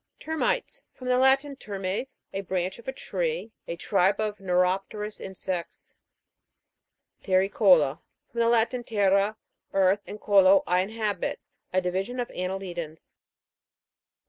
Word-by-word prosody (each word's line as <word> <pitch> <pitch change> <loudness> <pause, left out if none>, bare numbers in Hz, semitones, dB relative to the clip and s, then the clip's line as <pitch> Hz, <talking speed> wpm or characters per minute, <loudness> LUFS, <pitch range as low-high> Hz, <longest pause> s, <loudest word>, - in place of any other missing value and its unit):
TER'MITES. 320 +9 -1
From 255 -1 -6
the 250 0 +4
Latin, 270 +2 +3
termes, 200 +2 -5
a 195 - -2
branch 185 0 -2
of 235 - -15
a - - 0
tree. 470 - -3 0.2
A 170 - -3
tribe 195 +3 +2
of 210 -1 -2
neuropterous 195 +3 0
insects. 185 -2 -5 1.3
TERRICO'LA. 185 -6 +4 0.3
From 235 - -5
the 230 0 +4
Latin, 240 +1 +2
terra, 200 -1 +2 0.4
earth, 195 +1 +3
and 210 - -7
colo, 195 -2 +5
I 180 +1 +2
inhabit. 210 -1 -2 0.3
A 185 - +2
divi 180 +1 0
sion 245 +5 -7
of 245 - -2
annelidans. 180 -4 -5
195 Hz, 125 wpm, -27 LUFS, 185-230 Hz, 1.3 s, colo